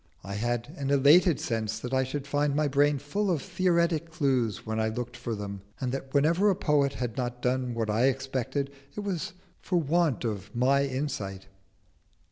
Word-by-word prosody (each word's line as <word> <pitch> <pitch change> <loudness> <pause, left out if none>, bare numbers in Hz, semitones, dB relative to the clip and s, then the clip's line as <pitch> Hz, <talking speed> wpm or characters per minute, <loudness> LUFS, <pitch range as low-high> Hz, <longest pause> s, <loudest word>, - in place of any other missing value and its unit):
I 100 - -6
had 120 +6 -2
an 140 -1 -2
elated 145 +5 +5
sense 110 -2 -2
that 125 +3 -6
I 130 0 +3
should 135 +2 -4
find 145 0 0
my 150 0 +2
brain 145 +1 +3
full 195 +9 -2
of 170 -4 +2
theoretic 170 0 +1
clues 130 - 0
when 110 0 -2
I 110 0 +1
looked 120 +2 -5
for 120 -1 -4
them, 100 -1 -6 0.2
and 130 -2 -1
that 135 0 -5
wherever 165 +8 +3
a 195 - +3
poet 145 -6 +2
had 125 -3 -4
not 125 -1 -2
done 125 -1 0
what 110 -2 -1
I 115 +4 +3
expected, 135 +1 -1 0.2
it - - -3
was 190 -5 -3 0.3
for 180 -2 0
want 160 -4 +1
of 105 -1 -4
my 135 +3 +3
insight. 130 -9 -3
135 Hz, 185 wpm, -28 LUFS, 120-150 Hz, 0.3 s, elated